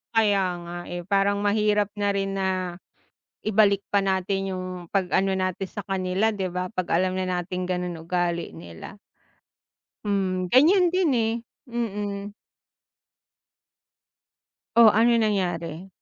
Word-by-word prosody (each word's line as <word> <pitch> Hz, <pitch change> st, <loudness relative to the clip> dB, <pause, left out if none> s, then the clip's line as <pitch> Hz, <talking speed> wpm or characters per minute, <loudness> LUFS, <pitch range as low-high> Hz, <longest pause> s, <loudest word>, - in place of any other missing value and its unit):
Kaya 205 Hz, -3 st, +4 dB, 0.2 s
nga, 170 Hz, 0 st, -7 dB
eh, 175 Hz, 0 st, -5 dB
parang 200 Hz, +2 st, +1 dB
mahirap 210 Hz, 0 st, +2 dB
na 205 Hz, -, +1 dB
rin 195 Hz, 0 st, -1 dB
na 190 Hz, 0 st, 0 dB, 1.0 s
ibalik 205 Hz, -2 st, +4 dB
pa 200 Hz, -, +4 dB
natin 195 Hz, 0 st, 0 dB
yung 185 Hz, 0 st, -4 dB, 0.2 s
'pag 190 Hz, -3 st, 0 dB
ano 195 Hz, 0 st, +3 dB
natin 185 Hz, +1 st, -1 dB
sa 205 Hz, -, -6 dB
kanila, 190 Hz, +2 st, 0 dB
'di 190 Hz, -3 st, -2 dB
ba? 180 Hz, +1 st, -3 dB
Pag 185 Hz, -1 st, -3 dB
alam 185 Hz, +2 st, +1 dB
na 185 Hz, -, -1 dB
natin 180 Hz, +1 st, -4 dB
ganon 180 Hz, -1 st, -2 dB
ugali 170 Hz, -, -1 dB
nila. 85 Hz, -, -10 dB, 1.1 s
Hmm, 185 Hz, -3 st, 0 dB
ganyan 350 Hz, -, +5 dB
din, 365 Hz, -5 st, +2 dB
eh, 225 Hz, -2 st, +1 dB, 0.4 s
mm. 205 Hz, -3 st, -3 dB, 2.4 s
Oh, 230 Hz, -1 st, +9 dB
ano 235 Hz, +3 st, +4 dB
nangyari? 180 Hz, -5 st, -1 dB
195 Hz, 125 wpm, -25 LUFS, 180-210 Hz, 2.4 s, Oh